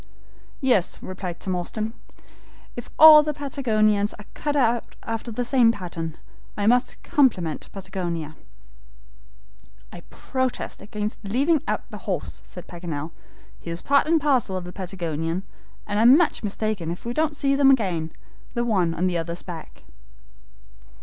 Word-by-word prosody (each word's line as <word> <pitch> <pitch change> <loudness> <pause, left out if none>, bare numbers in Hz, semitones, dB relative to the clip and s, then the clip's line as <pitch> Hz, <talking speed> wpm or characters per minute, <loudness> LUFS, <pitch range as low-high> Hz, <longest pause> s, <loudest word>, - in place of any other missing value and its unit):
"Yes," 245 -10 +2
replied 185 -2 -6
Tom 185 -1 -2
Austin, 215 +5 -3 0.8
"if 240 - -7
all 310 -1 +11
the 300 -1 -3
Patagonians 215 -8 +1
are 210 - -12
cut 295 -1 -2 0.5
after 225 +1 -4
the 245 +3 -2
same 245 -3 +4
pattern, 165 -6 -6 0.4
I 205 - 0
must 245 +3 +2
compliment 185 - +1
Patagonia." 175 -5 -5 1.6
"I - - -9
protest 260 -1 -3
against 210 +1 -5
leaving 275 +9 +2
out - - -1
the - - -7
horse," - - -3
said - - -10
Paganel. 165 -3 -5 0.5
"He - - -9
is 170 +1 -5
part 280 +1 +3
and 325 0 +4
parcel 260 -10 +1
of 185 - -5
the 180 0 -9
Patagonian, 170 -2 -3 0.4
and 205 0 -1
I'm 240 +5 +8
much 345 -2 +1
mistaken 210 -4 -2
if 175 +5 -6
we 235 - -2
don't 305 +1 0
see 275 -1 +2
them 275 0 +5
again, 180 -11 +1 0.4
the 240 0 0
one 185 -8 +1
on 180 - 0
the 175 -2 +1
other's 170 +1 -4
back." 170 -3 -9
210 Hz, 145 wpm, -24 LUFS, 175-260 Hz, 1.6 s, all